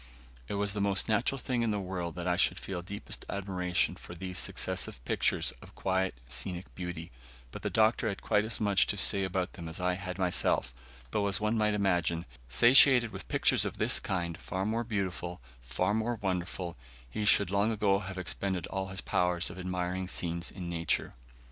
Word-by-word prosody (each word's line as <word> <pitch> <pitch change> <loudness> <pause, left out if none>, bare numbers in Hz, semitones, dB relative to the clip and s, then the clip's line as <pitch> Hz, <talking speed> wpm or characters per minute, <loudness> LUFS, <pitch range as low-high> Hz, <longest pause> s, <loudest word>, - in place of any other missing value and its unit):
It - - -3
was 100 0 0
the 105 - -1
most 100 -1 +2
natural 115 +5 +1
thing 125 -2 -1
in 115 - +1
the 105 -1 0
world 90 -3 -4
that 90 0 -4
I 90 - +3
should - - +2
feel 95 -2 -4
deepest 100 +3 -5
admiration 90 -3 0
for 90 - -10
these 90 +1 -4
successive - - -1
pictures - - +1
of - - -14
quiet 95 -3 0
scenic 85 +9 -4
beauty, 90 -3 -6 0.4
but - - -7
the - - -1
Doctor 110 +1 +3
had 100 - -4
quite 105 - +3
as 110 +1 -2
much 100 -3 +3
to 100 - 0
say 100 +1 +4
about 95 -1 -1
them 85 -3 -7
as 80 - -5
I 90 0 +1
had 90 -1 -5
myself, 90 -2 +1 0.4
though, 100 -1 +1
as 100 -1 +1
one 105 +1 +1
might 105 -1 +2
imagine, 90 -4 +1 0.2
satiated 125 - +7
with - - -8
pictures - - +3
of - - -3
this - - +5
kind 85 -3 -2
far 95 0 -3
more 115 +3 0
beautiful 95 -5 -3 0.2
far 65 +11 0
more 110 +2 0
wonderful 90 -3 -3 0.3
he 60 - -4
should 100 -2 +4
long 100 +3 +2
ago 100 -3 +2
have 95 -1 -6
expended 90 0 -2
all 95 0 -3
his 95 0 -6
powers 90 0 0
of 90 - -9
admiring 90 0 -2
scenes 85 -1 -2
in 90 -3 -7
nature. 85 -2 -1
95 Hz, 190 wpm, -31 LUFS, 90-105 Hz, 0.4 s, satiated